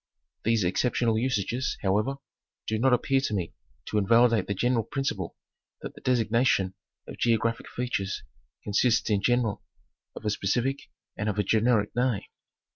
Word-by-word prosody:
'These 115 -2 +2
exceptional 115 +5 +1
usages, 125 +1 -1
however, 105 +8 +1 0.5
do 110 0 -1
not 130 +3 +3
appear 135 +2 +2
to 110 -6 -1
me 90 -4 -3 0.3
to 105 - 0
invalidate 115 0 +4
the 100 - -1
general 120 +2 +1
principle 115 - -3 0.5
that - - -6
the - - -14
designation 115 -5 +2 0.3
of - - -9
geographic 115 0 +1
features 110 -6 -3 0.4
consists 115 +3 +2
in 100 -1 +2
general 120 -3 +1 0.5
of - - -9
a 105 - +1
specific 125 +8 -1 0.3
and 105 +2 -2
of 105 - -2
a 105 - +2
generic 110 0 +2
name. 120 -4 +1
115 Hz, 145 wpm, -27 LUFS, 105-125 Hz, 0.5 s, invalidate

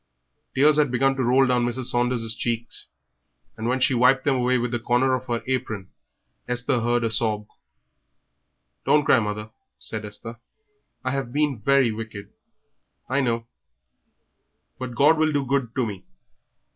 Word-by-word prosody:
Tears 150 +3 +5
had 145 -2 +3
begun 135 +2 +2
to 130 - -1
roll 130 +3 +4
down 125 -1 +2
Mrs. 120 +2 -2
Saunders' 120 -2 0
cheeks, 115 +1 -3 0.7
and 110 - -4
when 130 +2 +1
she 130 - +3
wiped 125 +2 +4
them 140 - +3
away 125 0 +2
with 120 0 -2
the 120 - -1
corner 125 +3 +2
of 130 0 -2
her 120 -2 -2
apron, 110 -7 -3 0.6
Esther 125 +1 0
heard 120 +1 +1
a 115 - 0
sob. 110 -2 0 1.4
"Don't 150 -1 +3
cry, 130 - +5
mother," 105 0 -4 0.3
said 110 -1 -4
Esther. 115 +3 -8 0.6
"I 130 - -1
have 135 -3 -3
been 145 -3 0
very 135 0 +3
wicked, 110 -2 -8 0.8
I 135 +2 +2
know, 115 -3 -1 1.3
but 130 -2 -5
God 155 +4 +5
will 155 0 +3
be 140 -1 0
good 130 -3 -1
to 130 - +1
me. 100 -4 -6
125 Hz, 160 wpm, -24 LUFS, 115-135 Hz, 1.4 s, Tears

